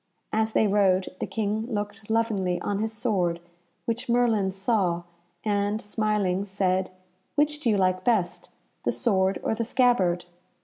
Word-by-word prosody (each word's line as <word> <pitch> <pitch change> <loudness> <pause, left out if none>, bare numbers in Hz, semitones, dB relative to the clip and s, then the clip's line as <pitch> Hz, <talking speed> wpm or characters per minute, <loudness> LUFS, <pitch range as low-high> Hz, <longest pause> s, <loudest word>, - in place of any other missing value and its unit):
As 220 0 +1
they - - +4
rode 195 -3 +2
the - - -2
King 220 +1 -1
looked 205 0 -4
lovingly 210 -6 +1
on 205 -1 -1
his 220 +1 -1
sword, 190 -7 0 0.5
which 235 +2 -3
Merlin 230 -5 +3
saw, 190 -3 0 0.4
and, 205 0 +1
smiling, 210 -3 0
said, 190 -1 0 0.5
"Which 295 0 +2
do 255 - 0
you 210 - +3
like 185 -1 +1
best, 200 -7 0 0.3
the - - 0
sword 190 -5 +1
or - - +1
the 225 +1 -1
scabbard?" 220 -8 +2
205 Hz, 145 wpm, -26 LUFS, 190-225 Hz, 0.5 s, they